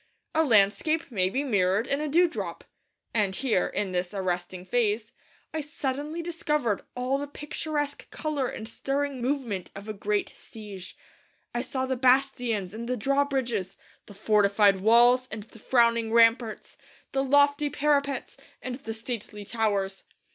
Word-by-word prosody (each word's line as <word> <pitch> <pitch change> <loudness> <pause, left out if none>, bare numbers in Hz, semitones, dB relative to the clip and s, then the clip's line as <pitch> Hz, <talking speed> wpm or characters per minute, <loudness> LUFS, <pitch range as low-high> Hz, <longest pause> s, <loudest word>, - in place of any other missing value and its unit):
A 320 - +4
landscape 235 +6 +3
may 185 -4 +2
be 270 +8 -1
mirrored 200 -4 +2
in 280 +3 0
a 305 - -1
dewdrop; 340 +3 +1 0.5
and 205 -4 +1
here, 225 -7 +1
in 200 -2 -2
this 180 +2 -2
arresting 180 -1 -3
phrase, 220 0 0 0.4
I 315 - -1
suddenly 295 +2 -4
discovered 300 - -1
all 255 +2 0
the 285 - -4
picturesque 295 0 -4
colour 300 -4 -2
and 220 - -6
stirring 275 +2 -2
movement 240 -8 -2
of 200 +2 -9
a 215 - -3
great 205 0 -1
siege. 205 -4 -10 0.6
I 240 - 0
saw 260 +1 -2
the 260 0 -1
bastions 250 -6 +2
and 235 +2 -6
the 250 - 0
drawbridges; 255 -6 0 0.3
the 205 - -12
fortified 200 -1 +3
walls 240 +4 +5
and 215 -1 -5
the 225 +1 -17
frowning 235 -1 +3
ramparts; 230 0 +3 0.3
the 270 0 +1
lofty 285 +2 +4
parapets 285 -1 0 0.2
and 250 -1 -5
the 225 -5 -6
stately 220 -3 -6
towers. 200 -3 -1
235 Hz, 145 wpm, -27 LUFS, 205-280 Hz, 0.6 s, walls